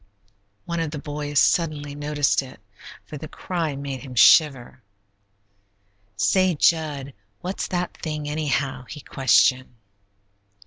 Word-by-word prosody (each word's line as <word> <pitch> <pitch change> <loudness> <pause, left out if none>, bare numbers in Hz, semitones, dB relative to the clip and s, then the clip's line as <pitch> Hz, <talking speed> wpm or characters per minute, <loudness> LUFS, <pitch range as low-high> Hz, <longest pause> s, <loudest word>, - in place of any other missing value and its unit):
One 170 0 -3
of 165 -2 -1
the 150 - -6
boys 145 -1 -5
suddenly 150 -2 +2
noticed 145 -1 0
it, 130 -4 -12 0.5
for 150 - -8
the 155 - -7
cry 165 -3 -3
made 140 -1 -5
him 130 -2 -10
shiver. 130 -1 +4 1.4
"Say, 185 - +2
Jud, 145 -3 +1 0.3
what's 185 +2 -4
that 180 -1 -3
thing, 150 -2 -5
anyhow?" 145 -4 -2
he 150 - -8
questioned. 130 -1 +2
145 Hz, 120 wpm, -23 LUFS, 135-160 Hz, 1.4 s, shiver